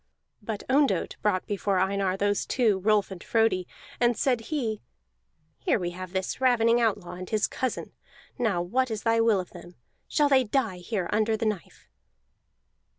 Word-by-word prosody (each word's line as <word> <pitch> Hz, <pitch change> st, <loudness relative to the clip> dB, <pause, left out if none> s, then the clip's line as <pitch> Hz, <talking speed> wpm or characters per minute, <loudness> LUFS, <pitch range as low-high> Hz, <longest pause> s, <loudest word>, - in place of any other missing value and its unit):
But 210 Hz, -1 st, -5 dB
Ondott 265 Hz, -, +2 dB
brought 195 Hz, -3 st, +1 dB
before 200 Hz, -1 st, -1 dB
Einar 190 Hz, 0 st, +1 dB
those 205 Hz, +1 st, 0 dB
two, 220 Hz, -6 st, +2 dB
Rolf 205 Hz, 0 st, +2 dB
and 185 Hz, -2 st, -8 dB
Frodi, 220 Hz, -6 st, +1 dB, 0.3 s
and 240 Hz, -1 st, +3 dB
said 250 Hz, -4 st, +1 dB
he: 235 Hz, -9 st, -2 dB, 0.8 s
"Here -, -, +1 dB
we 175 Hz, -3 st, -3 dB
have 185 Hz, 0 st, -8 dB
that 190 Hz, -1 st, -2 dB
ravening 240 Hz, -2 st, +4 dB
outlaw 210 Hz, -6 st, 0 dB
and 180 Hz, 0 st, -8 dB
his 215 Hz, -2 st, +1 dB
cousin; 260 Hz, -2 st, -3 dB, 0.5 s
now 205 Hz, -8 st, +1 dB
what 255 Hz, +8 st, 0 dB
is 220 Hz, -2 st, -4 dB
thy 230 Hz, 0 st, +3 dB
will 225 Hz, -3 st, +3 dB
of 180 Hz, -, -6 dB
them? 175 Hz, 0 st, -12 dB, 0.3 s
Shall 295 Hz, -1 st, +2 dB
they 270 Hz, -2 st, +4 dB
die 225 Hz, -5 st, -1 dB
here 180 Hz, 0 st, -3 dB
under 220 Hz, +1 st, +2 dB
the 225 Hz, -, -2 dB
knife?" 210 Hz, -5 st, -4 dB
215 Hz, 165 wpm, -27 LUFS, 190-230 Hz, 0.8 s, ravening